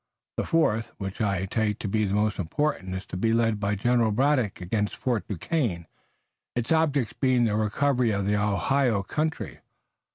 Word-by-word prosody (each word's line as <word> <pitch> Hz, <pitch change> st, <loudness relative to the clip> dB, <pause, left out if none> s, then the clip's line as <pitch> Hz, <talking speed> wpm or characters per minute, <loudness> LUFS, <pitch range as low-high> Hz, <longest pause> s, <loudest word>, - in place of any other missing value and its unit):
The -, -, -1 dB
fourth, 115 Hz, -9 st, +1 dB
which 95 Hz, 0 st, -5 dB
I 100 Hz, -3 st, 0 dB
take 105 Hz, +1 st, 0 dB
to 110 Hz, -, -4 dB
be 110 Hz, +2 st, +1 dB
the 100 Hz, 0 st, -1 dB
most 105 Hz, 0 st, +1 dB
important, 95 Hz, -, -1 dB
is 95 Hz, -, -5 dB
to -, -, -6 dB
be 115 Hz, +4 st, +1 dB
led 115 Hz, -2 st, +2 dB
by 100 Hz, +1 st, 0 dB
General 120 Hz, +2 st, +2 dB
Braddock 125 Hz, -1 st, +1 dB
against 105 Hz, +3 st, -1 dB
Fort 120 Hz, -4 st, -1 dB
Duquesne, 100 Hz, -, -2 dB, 0.7 s
its 120 Hz, -1 st, -2 dB
object 145 Hz, -7 st, +1 dB
being 130 Hz, -3 st, +3 dB
the 110 Hz, -3 st, +1 dB
recovery 120 Hz, +4 st, +1 dB
of 100 Hz, -2 st, 0 dB
the 105 Hz, +1 st, +2 dB
Ohio 105 Hz, +2 st, +1 dB
country. 155 Hz, +9 st, -3 dB
110 Hz, 170 wpm, -26 LUFS, 100-125 Hz, 0.7 s, being